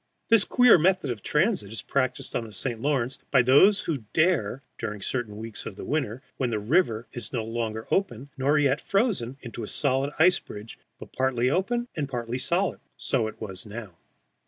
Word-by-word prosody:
This 225 -3 +5
queer 245 -7 +6
method 180 -4 +2
of 110 -4 -5
transit 150 - +1
is 110 -4 -5
practised 130 -2 -1
on - - 0
the 110 - -10
St. 115 +3 -2
Lawrence, 135 -3 0
by 130 -3 +5
those 185 +11 +6
who 140 -9 -3
dare, 145 - +1 0.2
during 105 -3 -4
certain 110 0 -3
weeks 110 0 -6
of 95 - -8
winter 130 -5 -2
when 130 -3 0
the 110 - -1
river 115 - +1
is 120 - -5
no 120 -4 -2
longer 110 -1 -3
open 140 - -1
nor 140 +3 +2
yet 145 -1 +2
frozen 195 - 0
into 120 -1 -7
a 105 - -5
solid 135 +2 +1
ice 180 +3 +5
bridge, 105 +2 -10 0.2
but - - -12
partly 130 -1 +1
open 240 +8 0
and 145 -4 -2
partly 120 -1 -3
solid. 180 +8 0 0.2
So 120 -5 0
it 110 - -9
was 95 -4 -6
now. 105 -3 -8
130 Hz, 185 wpm, -26 LUFS, 115-155 Hz, 0.2 s, queer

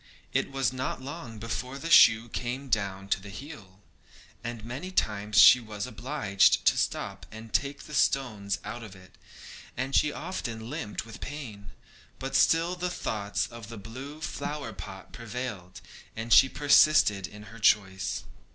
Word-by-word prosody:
It - - +1
was 135 -2 0
not 130 0 -3
long 130 -4 -8
before 125 +4 -4
the 165 +4 -5
shoe 110 -5 +7
came 125 +4 -4
down 100 -4 -1
at 95 -1 0
the 100 - -10
heel, 100 -5 -10 0.7
and 120 -2 -6
many 135 +10 -6
times 105 - -1
she 125 - +10
was 110 -2 -6
obliged 125 -4 +2
to - - +5
stop - - -2
to 110 +1 -10
take 140 +5 -1
the 150 - -11
stones 110 -9 +1
out 110 +3 -6
of 105 -4 -10
it, 90 0 -17 0.6
and 130 +2 -3
she 150 - +4
often 120 -10 -5
limped 145 -9 -4
with 115 - -11
pain; 115 -9 -7 0.5
but - - -5
still 165 +2 +3
the 180 0 -2
thoughts 105 - -2
of 115 -2 -10
the 115 - -8
blue 130 +9 -9
flower 150 -1 -4
pot 95 0 -10
prevailed, 115 -6 -6 0.3
and 115 +1 0
she 135 - +8
persisted 145 -10 +4
in 105 0 -12
her 115 - -11
choice. 95 -3 +2
115 Hz, 160 wpm, -28 LUFS, 105-140 Hz, 0.7 s, she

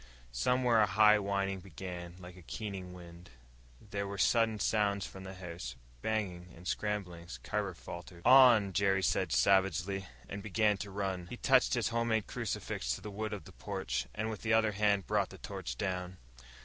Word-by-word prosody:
Somewhere 120 - +3
a 105 - +4
high 105 +1 +6
whining 100 -1 -1
began, 90 -1 -8
like 90 -1 -11
a 90 - -13
keening 95 0 -6
wind. 85 -1 -12 0.5
There 100 +2 -4
were 100 0 -5
sudden 115 +2 +3
sounds 100 -1 +1
from 95 0 -9
the 95 0 -7
house 85 -8 -7 0.3
bangings 90 - -3
and 90 +2 -10
scramblings. 90 -5 -3
Carver 105 -3 -2
faltered. 85 0 -10
"On!" 125 -7 +7
Jerry 95 0 +2
said - - +1
savagely, 95 0 +2 0.2
and 100 - -6
began 105 0 +2
to 100 +1 -6
run. 95 -3 -3
He - - -7
touched - - +4
his - - +1
home 115 0 0
made 110 -2 +1
crucifix - - -3
to - - -10
the 105 - -7
wood 110 +1 -3
of 105 -2 -5
the - - -13
porch, - - -3
and 110 +1 -2
with 105 - -6
the 110 0 +1
other 110 -1 +4
hand 100 -2 +2
brought - - +1
the - - -11
torch - - -6
down. 90 -1 -3
100 Hz, 180 wpm, -33 LUFS, 90-105 Hz, 0.5 s, On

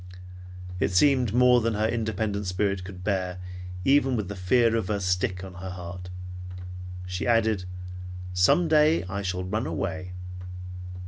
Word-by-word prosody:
It - - +2
seemed 125 +3 +4
more 125 +1 +6
than 115 -1 +1
her 105 +1 +2
independent 110 -3 -1
spirit 95 +1 0
could 90 -1 -9
bear 95 -3 -1 0.5
even 135 -2 +4
with 105 -5 -2
the 100 - -4
fear 115 +5 +3
of 110 -5 0
the 105 0 0
stick 90 0 0
on 95 -1 -8
her 90 +1 -6
heart. 90 0 -7 1.0
She 90 +4 -3
added, 110 -5 +3 0.7
"Some 90 - +4
day 155 -2 +5
I 95 +2 -3
shall 90 -1 -2
ran 105 +6 -1
away." 90 -2 -3
100 Hz, 145 wpm, -27 LUFS, 90-115 Hz, 1.0 s, more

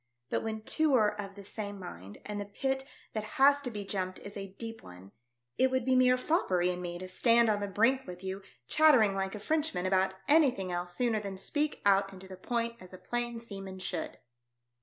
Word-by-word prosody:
But - - +2
v/hen 220 -1 -4
two 310 +3 +2
are 215 -3 +4
of 195 -1 -8
the 200 -1 -11
same 205 0 -5
mind, 95 - -9
and 205 -1 -4
the - - -4
pit 265 +6 -2 0.3
that 215 - -2
has 280 +1 +6
to 265 - -3
be 205 -3 -6
jumped 185 -2 -2
is 200 - -10
a 195 -1 -7
deep 225 -1 -6
one, 90 +2 -13 0.5
it 260 - +5
would 260 -2 0
be 260 0 +3
mere 255 0 +5
foppery 185 - +1
in 180 0 -5
me 175 -1 -4
to 185 +1 -7
stand 230 +4 +4
on 210 -1 +2
the 205 - -2
brink 245 +7 +2
with 180 +1 -8
you, 190 +1 -4 0.3
chattering 260 -10 +5
like 195 +1 -2
a - - -6
Frenchman 290 - 0
about 190 0 +2
anything 270 - +3
else 175 0 -3
sooner 235 -3 +1
than 200 -2 -6
speak 295 +9 -1
out 195 0 +4
and 190 - -11
to 190 - -11
the 190 - -8
point 235 +4 -2
as 185 0 -13
a - - -7
plain 240 +2 -3
seaman 195 -4 -8
should." 185 - -3
205 Hz, 220 wpm, -31 LUFS, 190-245 Hz, 0.5 s, has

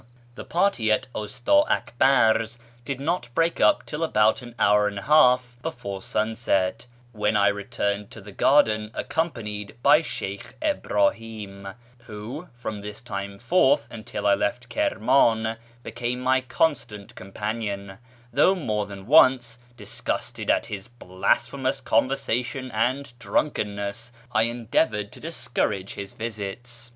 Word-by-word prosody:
— - - -29
The - - -9
party 170 - +1
at 110 - +2
Usta 285 - +2
Akbar's 120 -2 +2 0.3
did 135 0 -3
not 155 -3 -1
break 165 0 +1
up 305 - +4
till 150 +2 -4
about 110 -6 +3
an 120 -1 -11
hour 105 -1 +4
and 100 -1 -4
a 100 - -5
half 125 -5 +4
before 100 -12 -5
sunset, 110 0 -1 0.2
when 105 -1 +1
I 100 0 +5
returned 100 0 -2
to - - -11
the 105 0 -11
garden 110 -3 +3
accompanied 105 -11 -3
by 150 +3 +6
Sheykh 100 -10 -6
Ibrahim, 110 - -1 0.2
who 120 +9 -8
from 110 -4 -5
this 105 +2 -8
time 100 -3 -5
forth 120 - +3
until 105 -2 -6
I 100 - +5
left 120 +4 -1
Ivirman 110 -1 +2 0.3
became 120 +1 -3
my 130 +1 +2
constant 130 -6 -1
companion, 100 0 -5 0.3
though 190 +9 +5
more 105 - -2
than 100 -1 -9
once, 125 -3 +5 0.2
disgusted - - -4
at - - +3
his 100 -2 -7
blasphemous 130 +5 -1
conversation 130 +1 0
and 125 +4 -1
drunkenness, 105 -3 -2 0.2
I 110 0 +3
endeavoured 115 -2 0
to - - -12
discourage 95 0 -2
his 100 -1 -7
visits. 115 +2 -6
115 Hz, 130 wpm, -25 LUFS, 105-130 Hz, 0.3 s, by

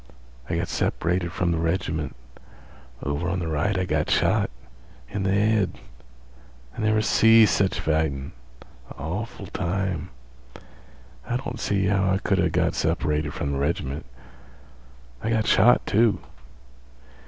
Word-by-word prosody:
I - - 0
got - - -1
separated 85 +1 -1
from 90 0 0
the 85 - 0
reg'ment. 80 -3 -2 0.9
Over 70 +5 -2
on 90 +1 -1
th' - - -3
right, 80 +5 0
I 95 - 0
got - - 0
shot. - - +2 0.6
In 100 - -2
th' - - 0
head. 105 +1 +2 1.0
I - - -5
never 110 0 +2
see 115 0 +6
sech 95 -1 +1
fightin'. 80 -2 -1 0.7
Awful 100 +7 -5
time. 90 -1 -2 1.2
I 120 - 0
don't 125 -2 -6
see 100 -3 0
how 95 0 +2
I 95 - +2
could 95 -1 0
a' 90 -1 +3
got - - +1
separated 75 +1 -1
from 75 -4 -2
th' 70 - -2
reg'ment. 70 -2 -2 1.1
I 110 - -2
got 110 -2 +1
shot, 120 +5 +5
too." 105 -3 +3
95 Hz, 135 wpm, -25 LUFS, 80-100 Hz, 1.2 s, see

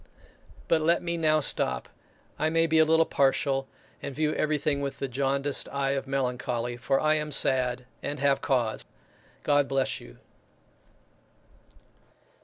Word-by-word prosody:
But 160 - +3
let 170 +2 +2
me 170 0 -1
now 155 -2 +2
stop; 65 - 0 0.5
I 155 - +2
may 165 +1 +2
be 160 -1 +3
a 160 - +6
little 160 +1 +4
partial, 135 -1 +1 0.3
and 140 - -6
view 155 0 +1
everything 150 -1 0
with 140 -1 -4
the 135 - -3
jaundiced 140 +2 -1
eye 140 -1 -1
of 135 -1 -2
melancholy 125 -2 -2
for 135 +3 0
I 155 0 +3
am 150 -1 -2
sad 125 -2 +2 0.2
and 145 0 -4
have 135 0 +2
cause. 120 -6 0 0.6
God 145 -1 +3
bless 135 -1 0
you! - - -14
140 Hz, 145 wpm, -27 LUFS, 130-155 Hz, 0.6 s, a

